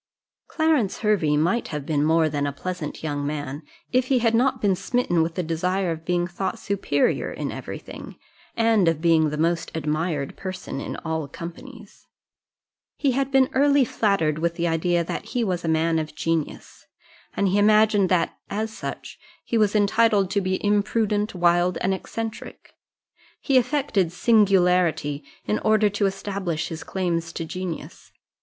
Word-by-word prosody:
Clarence 310 Hz, -, +1 dB
Hervey 190 Hz, -9 st, +2 dB
might 175 Hz, +10 st, +1 dB
have 150 Hz, -3 st, -5 dB
been 145 Hz, -2 st, 0 dB
more 160 Hz, +1 st, +3 dB
than 145 Hz, -1 st, -1 dB
a -, -, -1 dB
pleasant 165 Hz, +1 st, -6 dB
young 145 Hz, -2 st, -2 dB
man, 145 Hz, -1 st, -4 dB, 0.3 s
if 255 Hz, 0 st, +2 dB
he 265 Hz, -, +3 dB
had 230 Hz, -2 st, +2 dB
not 255 Hz, +2 st, +2 dB
been 200 Hz, -3 st, +2 dB
smitten 195 Hz, -3 st, 0 dB
with 165 Hz, +1 st, -1 dB
the 180 Hz, -, -1 dB
desire 180 Hz, +3 st, -1 dB
of 160 Hz, 0 st, -6 dB
being 175 Hz, 0 st, +1 dB
thought 175 Hz, +2 st, -3 dB
superior 195 Hz, -8 st, 0 dB
in -, -, -4 dB
every -, -, -6 dB
thing, -, -, -10 dB, 0.4 s
and 225 Hz, -5 st, +3 dB
of 165 Hz, -2 st, +2 dB
being 160 Hz, -2 st, +3 dB
the 150 Hz, -, -4 dB
most 165 Hz, +1 st, 0 dB
admired 155 Hz, -1 st, -2 dB
person 185 Hz, -7 st, -6 dB
in -, -, -5 dB
all 160 Hz, -2 st, -2 dB
companies. 205 Hz, -, -10 dB, 0.9 s
He 280 Hz, -, +2 dB
had 270 Hz, +1 st, 0 dB
been 265 Hz, -1 st, +5 dB
early 280 Hz, 0 st, +4 dB
flattered 195 Hz, -10 st, +1 dB
with 170 Hz, +1 st, -1 dB
the 170 Hz, -1 st, -1 dB
idea 170 Hz, +1 st, +1 dB
that -, -, -5 dB
he 245 Hz, -, -2 dB
was 180 Hz, -5 st, -2 dB
a -, -, -3 dB
man 160 Hz, 0 st, +2 dB
of 155 Hz, -1 st, -5 dB
genius; 165 Hz, -1 st, -3 dB, 0.5 s
and 200 Hz, -1 st, +2 dB
he 200 Hz, +2 st, +2 dB
imagined 210 Hz, -2 st, +4 dB
that, 175 Hz, -3 st, +1 dB
as 220 Hz, +2 st, -3 dB
such, -, -, -7 dB, 0.3 s
he -, -, -2 dB
was 215 Hz, -2 st, +3 dB
entitled 205 Hz, -1 st, +3 dB
to 200 Hz, -1 st, +1 dB
be 185 Hz, 0 st, -1 dB
imprudent, 210 Hz, 0 st, +1 dB
wild, 175 Hz, +1 st, +2 dB
and 190 Hz, -, 0 dB
eccentric. 225 Hz, +4 st, -6 dB, 0.7 s
He 275 Hz, -, 0 dB
affected 250 Hz, -, 0 dB
singularity, 180 Hz, -8 st, +2 dB, 0.2 s
in 210 Hz, -, 0 dB
order 215 Hz, -1 st, +3 dB
to 205 Hz, 0 st, +1 dB
establish 190 Hz, -4 st, -3 dB
his 160 Hz, -1 st, -6 dB
claims 170 Hz, -3 st, -2 dB
to 165 Hz, -, -4 dB
genius. 180 Hz, 0 st, -7 dB
185 Hz, 165 wpm, -24 LUFS, 165-215 Hz, 0.9 s, been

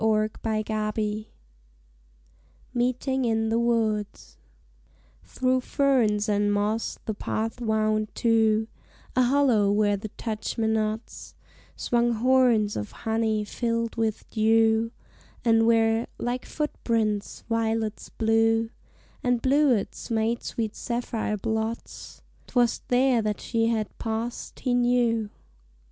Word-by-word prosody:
Why, 215 Hz, -1 st, +3 dB
why, 215 Hz, -1 st, -1 dB
ah 215 Hz, -1 st, -1 dB
me! 215 Hz, 0 st, -2 dB, 1.4 s
MEETING 255 Hz, +2 st, 0 dB
IN 225 Hz, -1 st, +1 dB
THE 225 Hz, +1 st, +2 dB
WOODS 220 Hz, -3 st, -1 dB, 0.9 s
Through 255 Hz, 0 st, 0 dB
ferns 245 Hz, -7 st, +2 dB
and 205 Hz, 0 st, +2 dB
moss 210 Hz, +2 st, -1 dB
the 220 Hz, -, -2 dB
path 225 Hz, +3 st, -3 dB
wound 215 Hz, -1 st, +1 dB
to 220 Hz, -1 st, +2 dB, 0.5 s
A 255 Hz, -, +4 dB
hollow 245 Hz, -6 st, +3 dB
where 205 Hz, 0 st, +2 dB
the 210 Hz, +2 st, -7 dB
touchmenots 220 Hz, 0 st, -2 dB, 0.4 s
Swung 240 Hz, 0 st, +1 dB
horns 235 Hz, -3 st, +3 dB
of 105 Hz, -, -4 dB
honey 220 Hz, -1 st, +1 dB
filled 230 Hz, +1 st, -2 dB
with 225 Hz, -2 st, -2 dB
dew; 225 Hz, 0 st, +3 dB, 0.5 s
And 225 Hz, -1 st, +4 dB
where 225 Hz, 0 st, +3 dB
like 245 Hz, +1 st, -3 dB
foot 300 Hz, -1 st, -2 dB
prints 215 Hz, -3 st, -1 dB
violets 225 Hz, -1 st, -1 dB
blue 225 Hz, 0 st, +2 dB, 0.5 s
And 245 Hz, -1 st, +2 dB
bluets 265 Hz, -4 st, +1 dB
made 225 Hz, +1 st, 0 dB
sweet 220 Hz, -2 st, -3 dB
sapphire 235 Hz, -3 st, -2 dB
blots, 220 Hz, +2 st, -4 dB, 0.2 s
'Twas 240 Hz, -2 st, +1 dB
there 250 Hz, -1 st, +3 dB
that 210 Hz, -1 st, -2 dB
she 225 Hz, -1 st, 0 dB
had 220 Hz, -2 st, -1 dB
passed 225 Hz, +1 st, -4 dB
he 255 Hz, -2 st, 0 dB
knew. 240 Hz, -3 st, +2 dB
225 Hz, 115 wpm, -26 LUFS, 215-240 Hz, 1.4 s, A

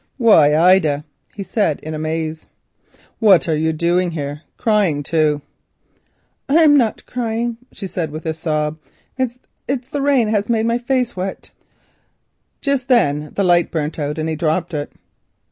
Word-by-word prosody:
"Why, 160 Hz, -, +5 dB
Ida," 160 Hz, -4 st, +3 dB, 0.3 s
he 200 Hz, -, -5 dB
said 195 Hz, -7 st, 0 dB
in 155 Hz, -, -6 dB
amaze, 155 Hz, 0 st, -4 dB, 0.7 s
"what 200 Hz, -7 st, +5 dB
are 160 Hz, -, +1 dB
you 160 Hz, +1 st, +1 dB
doing 175 Hz, +3 st, +1 dB
here, 145 Hz, -2 st, -5 dB, 0.2 s
crying 200 Hz, -10 st, +1 dB
too?" 150 Hz, -1 st, +1 dB, 1.1 s
"I'm 305 Hz, 0 st, +6 dB
not 235 Hz, -6 st, +1 dB
crying," 235 Hz, -1 st, -2 dB
she 200 Hz, -, -8 dB
said, 175 Hz, -4 st, -3 dB
with 155 Hz, +2 st, -8 dB
a 160 Hz, -, -1 dB
sob; 155 Hz, -1 st, -2 dB, 0.4 s
"it's 255 Hz, +1 st, -4 dB
the 285 Hz, -, -2 dB
rain 275 Hz, -4 st, +3 dB
that 215 Hz, -, -2 dB
has 210 Hz, 0 st, 0 dB
made 225 Hz, -1 st, +1 dB
my 230 Hz, +1 st, +1 dB
face 250 Hz, -1 st, -1 dB
wet." 185 Hz, +1 st, -5 dB, 1.1 s
Just 280 Hz, -3 st, -1 dB
then 150 Hz, -, +2 dB
the 200 Hz, -, +1 dB
light 175 Hz, -2 st, +3 dB
burnt 155 Hz, 0 st, -3 dB
out 150 Hz, +1 st, -3 dB
and 155 Hz, 0 st, -2 dB
he 160 Hz, -, -2 dB
dropped 165 Hz, +2 st, -1 dB
it. 145 Hz, -1 st, -3 dB
175 Hz, 155 wpm, -19 LUFS, 155-230 Hz, 1.1 s, I'm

